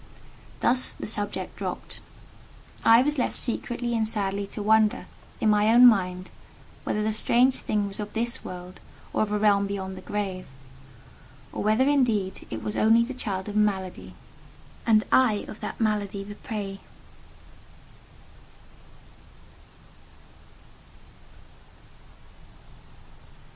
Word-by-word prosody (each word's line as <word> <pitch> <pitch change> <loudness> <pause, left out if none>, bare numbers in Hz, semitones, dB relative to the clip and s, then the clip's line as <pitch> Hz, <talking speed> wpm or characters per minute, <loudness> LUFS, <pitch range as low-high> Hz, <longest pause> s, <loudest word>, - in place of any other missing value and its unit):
Thus 250 +1 +2
the - - -7
subject 205 -1 -2
dropped. - - -6 0.8
I 230 +2 +7
was 295 0 0
left - - 0
secretly 240 0 -1
and 220 -1 0
sadly 200 -2 -2
to 210 - -6
wonder, 215 0 +3 0.3
in - - +1
my 210 +1 +3
own 240 +2 +8
mind, 185 -5 +3 0.5
whether 210 - -1
that 215 0 0
strange 245 +4 +3
thing 210 -1 -1
was 195 - -6
of 210 0 -5
this 235 +1 -1
world, 180 0 -9 0.3
or - - +1
of 215 -1 0
a 210 - +1
realm 200 -1 +3
beyond 190 -1 -5
the 185 - -9
grave; 190 -2 -4 1.0
or - - -5
whether 220 +6 +2
indeed 230 -9 +1
it - - -6
was 210 - -4
only 225 +2 +4
the 265 - -6
child 195 -6 -4
of 205 - -6
malady, 195 -3 -1 0.7
and 215 -1 +5
I 230 -6 +3
of 215 - -9
that - - -6
malady 210 -3 -1
the 205 +1 -9
prey. 205 -3 -6
210 Hz, 120 wpm, -26 LUFS, 200-230 Hz, 1.0 s, own